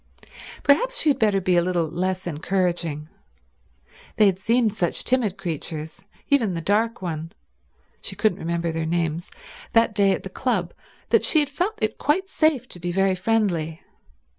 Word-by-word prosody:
Perhaps - - +3
she 305 - +3
had 270 - -2
better 210 -3 +3
be 185 -1 +1
a 175 - +5
little 175 -2 0
less 185 +3 -2
encouraging. 170 -2 -1 1.1
They 215 - +5
had 190 -2 +2
seemed 230 +1 +2
such 175 -5 -1
timid 235 -7 +1
creatures, 160 -3 -5 0.2
even 230 -10 +2
the - - -2
dark 215 +4 0
one—she 165 -1 -9
couldn't 210 -4 +1
remember 170 0 -1
their 160 0 -2
names—that 175 - -1
day 200 -2 +4
at - - -4
the - - -7
club, - - -1 0.4
that - - +4
she 315 - +3
had 290 -2 0
felt 370 +9 -1
it 215 0 -1
quite 370 +7 +1
safe 310 -8 +1
to 175 - -9
be 175 +1 -3
very 195 +1 +2
friendly. 180 -6 0
190 Hz, 160 wpm, -24 LUFS, 170-230 Hz, 1.1 s, a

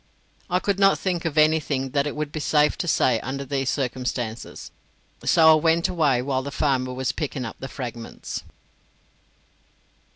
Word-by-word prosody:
I 180 - +2
could 195 +1 -1
not 195 0 +5
think 180 -3 -2
of 160 -2 -2
anything 150 -4 +2
that 140 +1 +1
it 145 - -4
would 150 -1 -3
be 155 - -4
safe 150 0 +2
to 175 - -2
say 125 -7 +3
under 140 +3 -5
the 135 0 -2
circumstances, 125 -3 -3 0.5
so 160 -1 +6
I - - +8
went 165 +2 +3
away 145 -8 +2
while 130 -1 -1
the 140 - -5
farmer 130 -3 0
was 130 0 -2
picking 140 -4 -4
up 115 - -7
the 135 - -6
fragments. 120 -4 -6
140 Hz, 165 wpm, -24 LUFS, 130-160 Hz, 0.5 s, I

